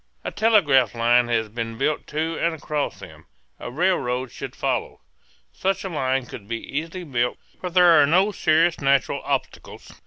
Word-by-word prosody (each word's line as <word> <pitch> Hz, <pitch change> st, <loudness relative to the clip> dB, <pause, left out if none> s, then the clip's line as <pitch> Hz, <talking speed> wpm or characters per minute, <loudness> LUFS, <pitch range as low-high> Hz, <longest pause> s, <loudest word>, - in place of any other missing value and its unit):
A -, -, -4 dB
telegraph 155 Hz, -, +3 dB
line 120 Hz, +1 st, +3 dB
has 115 Hz, -2 st, 0 dB
been 115 Hz, +1 st, -5 dB
built 145 Hz, +4 st, -1 dB
to 160 Hz, +2 st, -2 dB
and 165 Hz, -1 st, 0 dB
across 150 Hz, -1 st, -3 dB
them. -, -, -13 dB, 0.3 s
A -, -, -6 dB
rail 175 Hz, +8 st, +1 dB
road 125 Hz, -1 st, -3 dB
should -, -, -8 dB
follow. -, -, -2 dB, 0.5 s
Such 195 Hz, +1 st, -1 dB
a 190 Hz, -, -4 dB
line 135 Hz, -5 st, -1 dB
could 105 Hz, -4 st, -10 dB
be 115 Hz, +1 st, -3 dB
easily 165 Hz, +8 st, -5 dB
built, 125 Hz, -6 st, -1 dB, 0.2 s
for 180 Hz, -, -4 dB
there 175 Hz, -3 st, +6 dB
are 140 Hz, -, +4 dB
no 185 Hz, +7 st, +3 dB
serious 165 Hz, -3 st, +2 dB
natural 140 Hz, -1 st, +1 dB
obstacles. -, -, -4 dB
145 Hz, 175 wpm, -23 LUFS, 125-170 Hz, 0.5 s, there